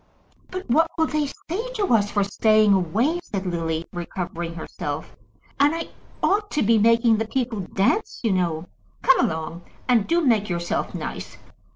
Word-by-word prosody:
"But 370 +1 -6
what 320 +7 +4
will 320 - +3
they 305 -2 0
say 420 - -5
to 405 - +1
us 205 -2 +3
for 205 -1 +1
staying 215 +1 +4
away?" 215 - +1
said 195 -10 -4
Lily, 165 -2 -2
recovering 175 -1 -5
herself. 150 -2 -5 0.4
"And 290 +3 +4
I 330 - -4 0.3
ought 415 +1 +2
to 300 - +2
be 225 +1 +4
making 230 +1 +4
the 225 0 -2
people 245 -3 -2
dance, 195 - 0
you 225 - +2
know. 175 -3 0 0.4
Come - - +5
along, 160 +2 -5 0.3
and 235 -5 +3
do 340 +1 +3
make 220 -5 +2
yourself 170 -1 -2
nice. - - -6
215 Hz, 165 wpm, -23 LUFS, 175-290 Hz, 0.4 s, Come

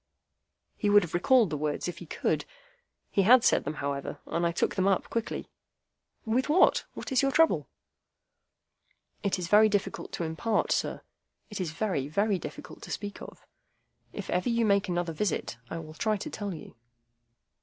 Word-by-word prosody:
He 210 - 0
would 205 0 +6
have 170 - -7
recalled 215 +2 +4
the 150 - -1
words 150 +2 -2
if 175 - -5
he - - -10
could. - - -1 0.7
He 200 - +3
had 235 +5 +7
said - - +3
them, 150 +2 -3
however, 140 -1 -3
and 170 0 0
I - - 0
took 170 - 0
them 190 0 +1
up 195 -2 +1
quickly. 230 -1 -3 0.7
"With 245 +5 0
what? 335 +5 +4
What - - -7
is 260 0 +4
your 275 - +2
trouble?" 325 +3 +3 1.5
"It 200 -2 0
is 180 -2 -4
very 210 +3 +6
difficult 205 -2 -2
to - - -2
impart, 165 +7 0
sir. - - 0 0.5
It 205 - -4
is 175 - -2
very, 165 -5 -2
very 200 +5 +1
difficult 150 -2 -9
to - - -10
speak 205 -1 -5
of. - - -11 0.7
If - - -6
ever 180 +6 +1
you 235 -1 +2
make 200 -1 +2
me - - 0
another 175 -1 -1
visit, 165 - -2
I 165 - -4
will 155 -1 -8
try 215 +5 0
to 200 - -6
tell 205 -2 -4
you." 165 - -9
195 Hz, 185 wpm, -29 LUFS, 165-215 Hz, 1.5 s, had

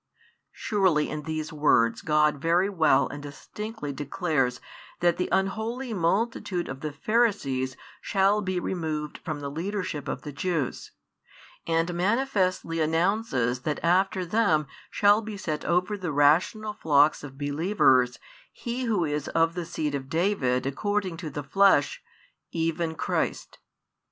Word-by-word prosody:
Surely 185 -8 +1
in 155 - -4
these 155 0 -4
words 115 -6 +3
God 150 -2 +2
very 175 +5 +2
well 160 -7 +3
and 145 - -7
distinctly 150 +3 -7
declares 140 -3 -1 0.4
that 175 -1 +2
the 180 - -1
unholy 220 +6 -1
multitude 190 0 0
of 130 0 -6
the 155 0 -4
Pharisees 145 - 0 0.2
shall 200 +1 +2
be 185 -2 -1
removed 155 -4 -3
from 155 -3 -5
the 140 -1 -4
leadership 180 -1 -4
of - - -4
the 150 - -6
Jews, 155 -2 -2 0.8
and 165 +1 +1
manifestly 185 -4 0
announces 160 - +1
|81 - - -28
that 150 - -2
after 185 +2 +2
them 175 -6 +2 0.2
shall 205 +1 +4
be 215 -2 -7
set 155 -5 -3
over 180 +4 +1
the 180 -5 -4
rational 165 +9 +2
flocks 150 -8 +3
of 135 -2 -9
believers 145 - +2 0.3
He 245 +2 -4
Who 210 -7 +1
is 150 -1 -2
of 165 0 +2
the 175 -1 -4
seed 155 -3 -3
of 135 -1 -4
David 160 -8 +1
according 190 +5 -1
to 160 -2 -5
the 145 0 -5
flesh, 145 -1 +3 0.5
even 165 0 -1
Christ. - - -2
165 Hz, 140 wpm, -26 LUFS, 145-195 Hz, 0.8 s, shall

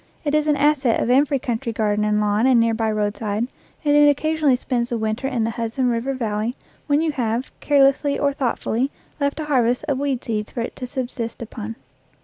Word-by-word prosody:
It 295 -2 -1
is 305 0 +2
an 300 - +3
asset 285 -4 +2
of 245 - +1
every 280 +2 +4
country 240 -2 -3
garden 210 -1 0
and 210 0 +2
lawn 210 +3 +2
and 255 -3 +5
near 230 0 +3
by 220 -1 0
roadside, 210 +1 -1 0.4
and 290 0 +4
it 295 0 +7
occasionally 305 -1 +2
spends 245 -1 -2
the 235 - -1
winter 220 +4 -2
in 250 -4 -1
the 225 - 0
Hudson 235 +3 -1
River 245 +3 -1
Valley 225 0 -2 0.3
when 290 +1 +3
you 320 - +1
have, 240 -2 -2
carelessly 280 0 +3
or 285 -1 +1
thoughtfully, 255 -1 -1 0.3
left 280 +1 -1
a 310 - -3
harvest 250 -4 +2
of 280 -3 0
weed 275 -3 -1
seeds 215 -2 -2
for 240 - -2
it 230 - -5
to 250 - -5
subsist 240 -3 -4
upon. 225 0 -7
245 Hz, 205 wpm, -22 LUFS, 225-280 Hz, 0.4 s, it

